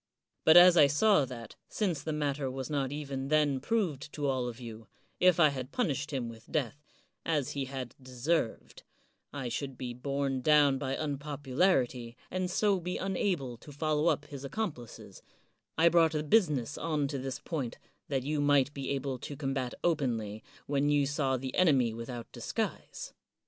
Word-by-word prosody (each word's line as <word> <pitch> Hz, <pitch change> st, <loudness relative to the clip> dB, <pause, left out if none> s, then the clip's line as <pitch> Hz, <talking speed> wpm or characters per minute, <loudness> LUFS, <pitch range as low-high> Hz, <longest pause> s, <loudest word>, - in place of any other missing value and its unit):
But 160 Hz, -, +8 dB
as 175 Hz, 0 st, +9 dB
I 145 Hz, -3 st, +8 dB
saw 150 Hz, +2 st, +4 dB
that, 120 Hz, -4 st, -9 dB
since 180 Hz, -9 st, -1 dB
the 155 Hz, -, -3 dB
matter 145 Hz, -2 st, -1 dB
was 130 Hz, +1 st, -5 dB
not 135 Hz, -3 st, 0 dB
even 140 Hz, -2 st, -4 dB
then 145 Hz, -2 st, +2 dB
proved 160 Hz, -, -1 dB
to 145 Hz, -, -3 dB
all 130 Hz, -3 st, 0 dB
of 120 Hz, 0 st, -7 dB
you, 115 Hz, -2 st, -9 dB, 0.3 s
if 180 Hz, -1 st, +5 dB
I 155 Hz, -3 st, +7 dB
had 130 Hz, -1 st, -5 dB
punished 150 Hz, -, -1 dB
him 130 Hz, -5 st, -2 dB
with 115 Hz, -1 st, -11 dB
death, 145 Hz, -1 st, -1 dB, 0.4 s
as 150 Hz, -5 st, 0 dB
he 140 Hz, -1 st, -2 dB
had 130 Hz, -3 st, -6 dB
deserved, 130 Hz, +1 st, -2 dB, 0.5 s
I 135 Hz, -3 st, -4 dB
should 135 Hz, +1 st, -4 dB
be 125 Hz, -1 st, -5 dB
borne 135 Hz, +1 st, -2 dB
down 145 Hz, -1 st, +4 dB
by 135 Hz, +1 st, -2 dB
unpopularity, 140 Hz, -4 st, 0 dB
and 185 Hz, -1 st, -1 dB
so 200 Hz, +1 st, +2 dB
be 180 Hz, +1 st, -3 dB
unable 180 Hz, -, -1 dB
to 145 Hz, -, -13 dB
follow 155 Hz, +2 st, 0 dB
up 145 Hz, -, +1 dB
his 140 Hz, -2 st, -9 dB
accomplices, 140 Hz, -, -5 dB, 0.6 s
I 165 Hz, +1 st, +5 dB
brought 165 Hz, -1 st, +4 dB
the 150 Hz, -1 st, -1 dB
business 150 Hz, -, +2 dB
on 155 Hz, -3 st, 0 dB
to 140 Hz, -, -3 dB
this 135 Hz, 0 st, -4 dB
point 140 Hz, -8 st, -4 dB, 0.3 s
that 135 Hz, -3 st, -1 dB
you 150 Hz, +1 st, -1 dB
might 145 Hz, -1 st, +3 dB
be 140 Hz, -2 st, -5 dB
able 135 Hz, -2 st, -2 dB
to 145 Hz, -, -7 dB
combat 135 Hz, -3 st, -2 dB
openly 115 Hz, -10 st, -1 dB, 0.2 s
when 145 Hz, 0 st, +1 dB
you 145 Hz, -1 st, +3 dB
saw 135 Hz, -2 st, 0 dB
the 130 Hz, 0 st, -5 dB
enemy 135 Hz, -10 st, +4 dB
without 115 Hz, +1 st, -6 dB
dis -, -, -6 dB
guise. -, -, -4 dB
140 Hz, 175 wpm, -31 LUFS, 130-155 Hz, 0.6 s, as